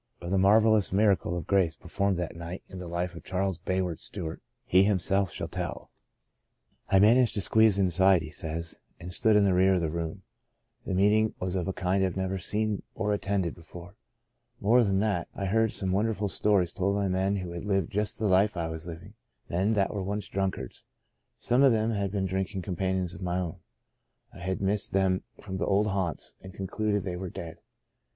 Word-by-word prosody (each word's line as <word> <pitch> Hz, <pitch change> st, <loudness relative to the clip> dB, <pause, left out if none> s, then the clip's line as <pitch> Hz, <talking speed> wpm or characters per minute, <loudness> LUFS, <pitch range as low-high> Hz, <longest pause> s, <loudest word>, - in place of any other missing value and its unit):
Of 85 Hz, +1 st, -6 dB
the 95 Hz, -, +3 dB
marvellous 105 Hz, +1 st, +4 dB
miracle 95 Hz, -3 st, +2 dB
of 85 Hz, -, -5 dB
grace 95 Hz, -5 st, +2 dB
performed 100 Hz, +3 st, -1 dB
that 85 Hz, -2 st, -4 dB
night 85 Hz, +2 st, -7 dB
in 95 Hz, -, -9 dB
the 90 Hz, -, -6 dB
life 85 Hz, +1 st, -2 dB
of 85 Hz, -, -10 dB
Charles 95 Hz, -1 st, -2 dB
Bayard 90 Hz, -2 st, -2 dB
Stewart, 85 Hz, -5 st, -6 dB, 0.2 s
he 95 Hz, +2 st, +5 dB
himself 95 Hz, -1 st, +1 dB
shall -, -, -5 dB
tell. -, -, -5 dB, 0.5 s
" -, -, -42 dB
I 95 Hz, -, +4 dB
managed 115 Hz, +4 st, +5 dB
to 100 Hz, -, 0 dB
squeeze 110 Hz, 0 st, +4 dB
inside," 95 Hz, -1 st, +4 dB
he 75 Hz, -, -8 dB
says, 80 Hz, +1 st, -5 dB, 0.2 s
''and 90 Hz, +1 st, -8 dB
stood 110 Hz, +1 st, +3 dB
in 105 Hz, -, +5 dB
the 95 Hz, -, +3 dB
rear 95 Hz, +1 st, +4 dB
of 90 Hz, -, 0 dB
the 80 Hz, -2 st, -1 dB
room. 85 Hz, -1 st, -4 dB, 0.6 s
The 95 Hz, -, -1 dB
meeting 105 Hz, +3 st, +3 dB
was 90 Hz, -1 st, -2 dB
of 90 Hz, -2 st, -2 dB
a -, -, 0 dB
kind 95 Hz, +1 st, 0 dB
I -, -, +3 dB
had 95 Hz, 0 st, -3 dB
never 95 Hz, 0 st, -2 dB
seen 105 Hz, +2 st, -1 dB
or 105 Hz, -1 st, 0 dB
attended 100 Hz, -4 st, -1 dB
before. 85 Hz, +2 st, -12 dB, 0.7 s
More 115 Hz, +4 st, +4 dB
than 100 Hz, -2 st, +1 dB
that, 100 Hz, -6 st, 0 dB
I 100 Hz, -, -3 dB
heard 110 Hz, +3 st, +2 dB
some 95 Hz, -1 st, -1 dB
wonderful 105 Hz, +1 st, 0 dB
stories 95 Hz, -4 st, +1 dB
told 100 Hz, +1 st, 0 dB
by 100 Hz, -1 st, 0 dB
men 95 Hz, +2 st, +1 dB
who 90 Hz, -3 st, -4 dB
had 85 Hz, 0 st, -6 dB
lived 95 Hz, -4 st, 0 dB
just 105 Hz, +1 st, 0 dB
the 110 Hz, -, -2 dB
life 100 Hz, +1 st, +3 dB
I 85 Hz, -1 st, -2 dB
was 80 Hz, +1 st, -7 dB
living 85 Hz, +4 st, -9 dB, 0.2 s
— -, -, -42 dB
men 95 Hz, +6 st, +1 dB
that 100 Hz, -2 st, +1 dB
once 100 Hz, +1 st, -3 dB
were -, -, -23 dB
drunkards. 95 Hz, -1 st, -3 dB, 0.5 s
Some 125 Hz, +2 st, +2 dB
of 135 Hz, -3 st, +6 dB
them 110 Hz, +1 st, +1 dB
had 100 Hz, -2 st, -1 dB
been 100 Hz, -2 st, -1 dB
drinking 95 Hz, +1 st, -2 dB
companions 95 Hz, 0 st, -2 dB
of -, -, -10 dB
my 90 Hz, -1 st, -1 dB
own. 90 Hz, -3 st, -4 dB, 0.7 s
I -, -, -12 dB
had 95 Hz, +2 st, -3 dB
missed 100 Hz, +1 st, 0 dB
them 95 Hz, -1 st, +2 dB, 0.2 s
from 95 Hz, -2 st, -6 dB
the -, -, -2 dB
old 105 Hz, +2 st, +2 dB
haunts, 95 Hz, -4 st, -3 dB
and 95 Hz, 0 st, -11 dB
concluded 105 Hz, +1 st, -1 dB
they 90 Hz, -2 st, -4 dB
were 95 Hz, 0 st, -5 dB
dead. 80 Hz, -1 st, -8 dB
95 Hz, 210 wpm, -28 LUFS, 90-100 Hz, 0.7 s, of